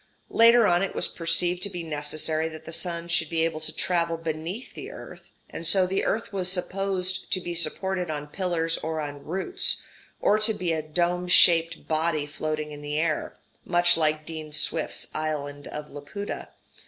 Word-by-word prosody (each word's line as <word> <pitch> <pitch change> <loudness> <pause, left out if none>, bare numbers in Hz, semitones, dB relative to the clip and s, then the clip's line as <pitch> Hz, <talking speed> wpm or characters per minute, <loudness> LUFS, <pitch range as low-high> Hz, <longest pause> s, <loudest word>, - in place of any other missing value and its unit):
Later 230 0 +6
on 175 -3 +3
it 195 - -2
was - - +2
perceived 175 +1 +2
to 200 - 0
be 175 -3 -6
necessary 155 +1 0
that 160 -1 -10
the 165 - -7
sun 170 0 -2
should 165 -2 +1
be 165 -1 +1
able 165 -1 -2
to - - -5
travel 170 -2 0
beneath 165 +7 -5
the - - -8
earth, - - -11 0.2
and 165 - -3
so 190 0 +7
the 190 +2 -1
earth 225 0 -2
was 185 -2 0
supposed 185 0 -1
to 185 - +2
be 175 -1 -5
supported 180 +2 +1
on 150 -1 -3
pillars 165 0 -2
or 160 0 -3
on 145 -2 -6
roots, 195 - +1 0.4
or 210 - +3
to 215 0 +4
be 175 -2 -1
a 160 - -1
dome 175 +3 -1
shaped 165 -2 +5
body 155 -1 0
floating 155 +1 -4
in 145 0 -9
air 155 +1 -1 0.3
much 175 0 +4
like 155 -1 0
Dean 155 -1 -7
Swift's 155 +1 0
island 145 -2 -4
of 150 0 -7
Laputa. 145 +9 -7
165 Hz, 180 wpm, -26 LUFS, 155-180 Hz, 0.4 s, so